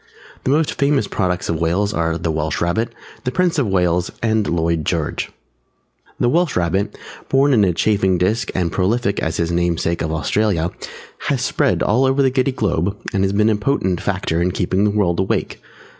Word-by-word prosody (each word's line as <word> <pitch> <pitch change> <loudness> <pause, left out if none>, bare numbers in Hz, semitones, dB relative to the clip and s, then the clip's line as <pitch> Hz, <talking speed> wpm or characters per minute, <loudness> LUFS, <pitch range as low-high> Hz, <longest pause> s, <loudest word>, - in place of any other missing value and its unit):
The - - +1
most 150 +2 +1
famous 140 -6 +2
products 90 -2 -1
of 85 0 -2
Wales 95 +5 +1
are 85 0 0
the 85 -1 -2
Welsh 80 -1 -2
Rabbit, 110 +8 0 0.3
the - - 0
Prince 175 +2 +1
of 130 - +1
Wales 90 -2 +1
and 110 -2 +1
Lloyd 85 -1 0
George. - - -2 0.9
The - - +2
Welsh 170 +5 +1
Rabbit, 90 +3 0 0.3
born 135 +1 +4
in 110 -4 +4
a 95 - +3
chafing 95 +1 +1
dish 105 +7 0
and 90 -3 0
prolific 100 +2 0
as 80 - -2
his 85 0 0
namesake 85 -1 0
of 80 - -1
Australia, 85 +1 0 0.6
has - - 0
spread - - +1
all 125 +5 +3
over 135 +1 +2
the 130 - +3
Giddy 130 +1 +1
Globe 100 -5 -1 0.2
and 95 0 +1
been 105 +1 +4
a - - +2
potent 105 -6 0
factor 80 +1 -1
in 90 +1 0
keeping 95 +3 +1
the - - +3
world 100 -5 +1
awake. 95 - -1
95 Hz, 185 wpm, -19 LUFS, 85-115 Hz, 0.9 s, born